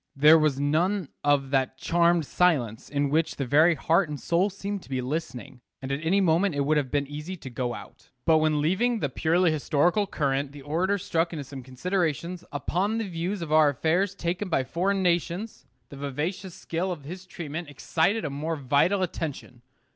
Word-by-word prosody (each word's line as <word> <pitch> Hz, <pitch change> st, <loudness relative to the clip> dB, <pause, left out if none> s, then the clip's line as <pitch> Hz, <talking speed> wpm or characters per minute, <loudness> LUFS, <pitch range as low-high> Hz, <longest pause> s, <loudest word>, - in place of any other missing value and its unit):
There 150 Hz, +3 st, +7 dB
was 150 Hz, -3 st, +1 dB
none 165 Hz, +4 st, +1 dB
of 140 Hz, -2 st, +2 dB
that 130 Hz, -1 st, +1 dB
charmed 170 Hz, +2 st, +2 dB
silence 135 Hz, -11 st, +1 dB
in 145 Hz, -1 st, 0 dB
which 160 Hz, +2 st, +1 dB
the 140 Hz, -, -3 dB
very 155 Hz, +6 st, +5 dB
heart 165 Hz, +3 st, +2 dB
and 145 Hz, -1 st, -5 dB
soul 175 Hz, +4 st, +1 dB
seem 200 Hz, +1 st, -5 dB
to -, -, -17 dB
be 130 Hz, -1 st, -1 dB
listening; 130 Hz, -2 st, -5 dB, 0.2 s
and 130 Hz, 0 st, -6 dB
at 140 Hz, +3 st, -2 dB
any 180 Hz, +5 st, +3 dB
moment 175 Hz, -1 st, +2 dB
it 145 Hz, -, 0 dB
would 150 Hz, +2 st, +2 dB
have 140 Hz, -3 st, 0 dB
been 145 Hz, 0 st, 0 dB
easy 150 Hz, +6 st, -6 dB
to 130 Hz, -5 st, -9 dB
go 120 Hz, 0 st, -2 dB
out. -, -, -13 dB, 0.2 s
But 160 Hz, -1 st, +5 dB
when 155 Hz, -1 st, +2 dB
leaving 215 Hz, +10 st, +1 dB
the 145 Hz, -9 st, -1 dB
purely 165 Hz, +5 st, +2 dB
historical 165 Hz, +6 st, +1 dB
current 140 Hz, -4 st, -1 dB
the 145 Hz, -1 st, -11 dB
orator 175 Hz, +8 st, 0 dB
struck 170 Hz, -2 st, -1 dB
into 150 Hz, -3 st, -4 dB
some 135 Hz, 0 st, -9 dB
considerations 170 Hz, +5 st, -2 dB
upon 185 Hz, +9 st, -1 dB
the 225 Hz, -2 st, -2 dB
views 175 Hz, +2 st, -3 dB
of 155 Hz, -, -6 dB
our 155 Hz, -1 st, +6 dB
affairs 175 Hz, +8 st, 0 dB
taken 180 Hz, +2 st, -3 dB
by 135 Hz, -6 st, +1 dB
foreign 190 Hz, +7 st, 0 dB
nations, 175 Hz, +4 st, -1 dB, 0.2 s
the 140 Hz, -, -10 dB
vivacious 155 Hz, +7 st, -4 dB
skill 175 Hz, +3 st, -3 dB
of 160 Hz, -5 st, -6 dB
his 180 Hz, +4 st, -8 dB
treatment 165 Hz, -2 st, -6 dB
excited 165 Hz, +8 st, 0 dB
a 145 Hz, -, -3 dB
more 155 Hz, +4 st, -3 dB
vital 150 Hz, +8 st, +2 dB
attention. 150 Hz, -8 st, -5 dB
160 Hz, 190 wpm, -26 LUFS, 145-180 Hz, 0.2 s, There